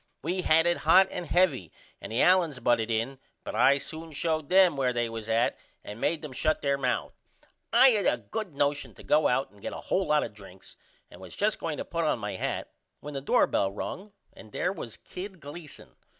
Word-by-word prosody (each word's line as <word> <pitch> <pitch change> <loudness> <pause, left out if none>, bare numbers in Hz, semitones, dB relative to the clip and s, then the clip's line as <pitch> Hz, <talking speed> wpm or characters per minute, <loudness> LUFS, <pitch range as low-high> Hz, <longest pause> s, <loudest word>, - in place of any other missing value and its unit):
We 180 +5 -1
had 165 -1 +4
it 175 0 +3
hot 190 +1 +5
and 175 - -5
heavy 150 - +2 0.3
and - - -8
the 115 - +2
Allens 175 -7 +3
butted 120 -2 +1
in 115 +4 -2 0.2
but - - -6
I 130 +5 +5
soon 160 +3 -7
showed 155 -1 -1
them 185 -4 +5
where 130 -2 0
they 120 -1 0
was 115 -1 -7
at 115 +2 +1 0.2
and 105 +3 -9
made 165 -1 0
them 150 - -6
shut 155 +4 0
there 140 -1 +2
mouth. 130 -3 -2 0.6
I 265 - +7
had 215 -5 +2
a - - +2
good 215 -8 -6
nosion 145 +1 -1
to - - -14
go 155 +1 +3
out 130 +2 0
and 100 -1 -20
get - - -5
a - - -6 0.2
hole 190 -2 +2
lot 150 0 +3
of 110 - -6
drinks 95 -2 -14 0.4
and - - -13
was 95 - -9
just 210 0 0
going 155 -3 -3
to - - -4
put 170 -1 -2
on 155 - +1
my 105 -3 -5
hat - - -3 0.3
when 150 - -8
the 135 - -4
doorbell 100 -7 +2
rung 190 - -6 0.2
and 110 - -14
there 180 - -1
was 120 - -8
Kid 185 0 -9
Gleason. 150 +1 -10
145 Hz, 220 wpm, -28 LUFS, 120-175 Hz, 0.6 s, I